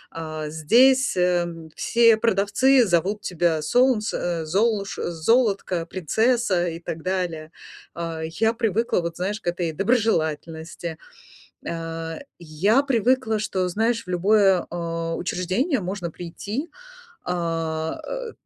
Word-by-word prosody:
Э, 155 -1 -5
здесь 245 - +4
э, 180 -1 +2 0.3
все 230 -1 +4
продавцы 230 +4 +3
зовут 190 +4 +1
тебя 170 -4 0
Солнце, 240 +5 +2 0.2
э, - - -6
Золуш 200 +4 0
Золотко, 190 0 +1
Принцесса 190 - +1
и 165 0 -6
так 165 -1 -6
далее. 175 -4 -3 0.4
Э, 165 -1 -4
я 220 +8 0
привыкла, 225 -3 0
вот, 170 0 -5
знаешь, 200 +4 -3
к - - -11
этой 175 -1 -1
доброжелательности. 165 -5 -1 0.7
Э, 165 -1 -4 0.2
я 175 - +2
привыкла, 250 -3 +1
что, 190 -3 -1
знаешь, 225 +5 0
в - - -13
любое, 190 +1 +3
э, 165 -1 -3
учреждение 185 - -1
можно 185 -2 -4
прийти, 205 - -5 0.6
а, 165 -2 -2
э, - - -5
180 Hz, 115 wpm, -23 LUFS, 165-225 Hz, 0.7 s, здесь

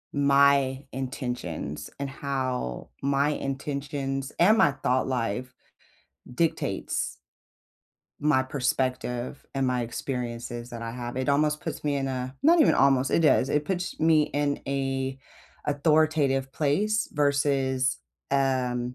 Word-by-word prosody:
my 140 -1 +4
intentions, 125 - -4
and 140 - -2
how 130 - -3
my 140 +1 +2
intentions 135 -1 -3
and 215 +6 +5
my - - +6
thought 130 0 0
life 125 0 -2 0.8
dictates 165 +3 -1 1.0
my 145 -3 +3
perspective, 130 -1 -2
and 135 -1 +1
my 125 -1 +1
experiences 120 -1 -4
that 115 -1 -7
I 115 0 -4
have. 120 0 -6
It 130 +1 -1
almost 150 +2 +2
puts - - -5
me 145 -1 0
in 135 -1 -1
a 130 -1 -3
not 335 +1 +6
even - - +5
almost, 135 -1 +3
it - - +3
does 145 -4 +4
it 150 0 +1
puts 180 +2 -3
me 160 -1 +4
in 145 -1 0
a 135 -1 -1 0.5
authoritative 145 -2 +2
place 205 +9 +1
versus, 140 -3 +1 0.3
um, 125 -2 0
135 Hz, 125 wpm, -27 LUFS, 130-145 Hz, 1.0 s, my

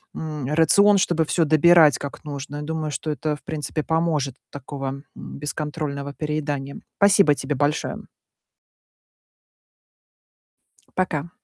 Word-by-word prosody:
М, 150 -4 -5
рацион, 200 +6 +5
чтобы 175 -4 +1
всё 165 +2 +1
добирать 155 -1 +6
как 140 - -7
нужно. 145 0 -6
Я - - -5
думаю, 155 0 -3
что 155 +1 -3
это, 150 +2 -2
в 145 - -16
принципе, 155 0 -4
поможет 160 -5 0
от - - -40
такого 135 0 -6
бесконтрольного 145 -1 -5
переедания. 145 -2 -3 0.2
Спасибо 200 -6 +5
тебе 140 +1 -3
большое. 145 +3 -1 2.9
Пока. 170 -4 -1
150 Hz, 115 wpm, -23 LUFS, 145-160 Hz, 2.9 s, добирать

